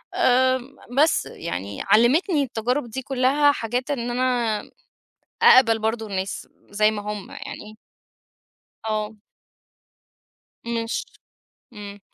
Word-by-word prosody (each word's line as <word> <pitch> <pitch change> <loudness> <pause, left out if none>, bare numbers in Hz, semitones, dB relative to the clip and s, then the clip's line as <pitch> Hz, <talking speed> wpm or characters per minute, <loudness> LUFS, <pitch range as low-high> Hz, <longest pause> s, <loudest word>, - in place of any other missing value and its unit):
آآ، 260 +1 +3
م 260 +2 -13 0.3
بس 315 - +1
يعني 100 - -6
علمتني 290 - +3
التجارب 245 +1 -2
دي 265 +4 -5
كلّها 270 +3 +3
حاجات 250 +2 -3
إن 240 -4 -2
أنا 240 -4 0 0.8
أقبل 230 -3 +7
برضو 220 0 -2
الناس، 195 -1 -4 0.2
زي 215 +1 +3
ما 210 -1 -4
هم 210 -2 -6
يعني. 215 +1 -9 1.1
آه. 215 0 -3 1.5
مش 230 -1 -2 0.7
آمم. 205 -1 -9
235 Hz, 105 wpm, -23 LUFS, 215-255 Hz, 1.5 s, أقبل